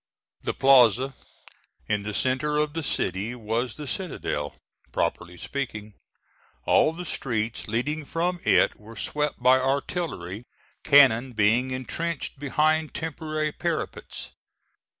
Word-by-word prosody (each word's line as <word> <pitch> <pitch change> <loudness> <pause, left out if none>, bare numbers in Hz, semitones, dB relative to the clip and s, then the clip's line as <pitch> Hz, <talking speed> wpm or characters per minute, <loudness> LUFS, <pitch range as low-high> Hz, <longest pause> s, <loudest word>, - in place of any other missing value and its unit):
The - - -3
plaza 130 -1 +5 0.7
in 105 -1 0
the 105 +1 -5
centre 140 +4 +1
of 150 0 0
the 165 - -2
city 110 -5 -1
was 115 +1 -2
the 150 - -7
citadel, 130 - -3 0.4
properly 90 0 -2
speaking. 110 -4 -5 0.7
All - - +4
the 175 +2 -7
streets 115 -7 -2
leading 145 +8 -1
from 175 +4 -1
it - - +4
were 110 +2 -12
swept 150 -1 -2
by 130 +1 +6
artillery, 130 - -2 0.4
cannon 130 -4 +6
being 110 +4 +3
intrenched 140 +4 -4
behind 155 +2 +1
temporary 155 -1 -2
parapets. - - -4
130 Hz, 115 wpm, -26 LUFS, 115-150 Hz, 0.7 s, by